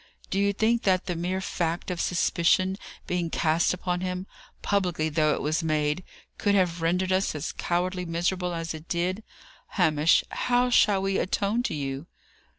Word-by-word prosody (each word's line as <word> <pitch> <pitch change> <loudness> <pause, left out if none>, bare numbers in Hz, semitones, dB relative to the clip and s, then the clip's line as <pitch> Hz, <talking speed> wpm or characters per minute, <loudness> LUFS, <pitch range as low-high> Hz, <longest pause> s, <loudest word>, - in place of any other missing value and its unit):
"Do 195 - +1
you 200 0 +3
think 225 +3 +1
that 185 -2 +2
the 180 -2 -2
mere 180 +3 -2
fact 170 -1 -2
of 175 - -2
suspicion 180 +2 +2 0.3
being 175 -2 -1
cast 160 +1 +2
upon 180 0 -2
him, 185 0 -3 0.4
publicly 180 -6 0
though 155 -1 +2
it - - -5
was 155 +3 0
made, 155 +1 0 0.4
could 205 -2 +2
have 175 -3 +1
rendered 180 +3 +1
us 185 -3 +1
as 150 +1 -3
cowardly 180 +1 -1
miserable 180 +2 -1
as 165 0 -3
it 160 +1 -10
did? 180 +4 -1 0.6
Hamish, 155 -3 +4
how 245 0 +1
shall 200 -4 +4
we 195 0 +1
atone 205 +5 0
to 245 - -2
you?" 140 +1 -4
180 Hz, 165 wpm, -26 LUFS, 165-190 Hz, 0.6 s, Hamish